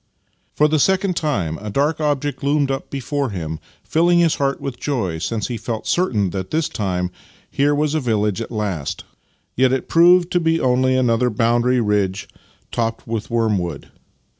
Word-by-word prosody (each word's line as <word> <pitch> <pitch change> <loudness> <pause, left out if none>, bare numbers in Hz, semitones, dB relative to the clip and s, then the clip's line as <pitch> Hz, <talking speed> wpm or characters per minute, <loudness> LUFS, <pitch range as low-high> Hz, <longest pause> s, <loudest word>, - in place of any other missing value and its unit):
For 150 - +4
the 155 0 +1
second 190 +3 +2
time 100 - -1
a 105 - -5
dark 145 +9 0
object 145 -2 -1
loomed 140 -1 +1
up 135 - -4
before 140 0 -2
him, 80 -5 -5 0.2
filling 175 +2 +3
his 170 -2 +3
heart 140 -1 0
with 125 -3 -6
joy, 110 - -2
since 110 +6 -2
he 120 - -3
felt 110 0 -5
certain 110 - +1
this 100 - -2
time 90 -3 -2
that - - -32 0.4
here 145 +1 +2
was 150 0 0
a 160 - +1
village 110 -5 0
at 115 - -5
last: 90 - -3 0.5
yet 130 0 +3
it 130 -1 -1
proved 175 +1 +5
to 175 - +2
be 165 -1 +1
only 130 0 +2
another 125 -1 +2
boundary 120 +3 +2
ridge 105 -3 0 0.4
topped 115 -1 -2
with 115 -2 -4
worm 115 -4 +1
wood. 85 -5 -6
125 Hz, 175 wpm, -20 LUFS, 105-145 Hz, 0.5 s, proved